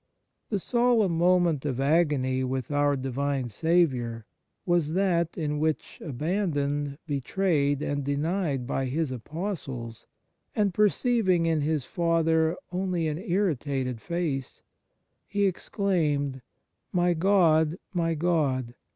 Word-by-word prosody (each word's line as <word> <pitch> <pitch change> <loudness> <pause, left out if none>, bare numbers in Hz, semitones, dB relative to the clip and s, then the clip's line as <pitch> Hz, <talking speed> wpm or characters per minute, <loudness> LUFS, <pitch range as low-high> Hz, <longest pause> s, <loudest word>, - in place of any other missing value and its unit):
The 210 - 0
solemn 235 -3 +2
moment 175 -3 +3
of 135 -4 -2
agony 140 -3 +2
with 130 0 -3
our 145 0 +2
Divine 135 0 -2
Saviour 125 - +1 0.4
was 170 -4 +1
that 175 -3 +1
in 150 -3 -1
which, 155 0 -2
abandoned, 145 -2 -1
betrayed, 145 0 0
and 145 -1 -2
denied 145 -1 -1
by 135 +1 -1
His 145 +2 -1
Apostles, 130 - -5 0.5
and 205 -3 +1
perceiving 210 -3 +2
in 160 -2 +1
His 150 -2 0
Father 165 -1 +1
only 180 -3 -1
an 150 +1 -3
irritated 145 - -1
face, 165 -7 -3 0.6
He 205 0 +1
exclaimed, 155 -8 0 0.3
" - - -52
My 175 -1 +2
God! 165 -3 +3 0.2
My 165 -2 0
God! 145 -7 0
160 Hz, 115 wpm, -27 LUFS, 140-175 Hz, 0.6 s, moment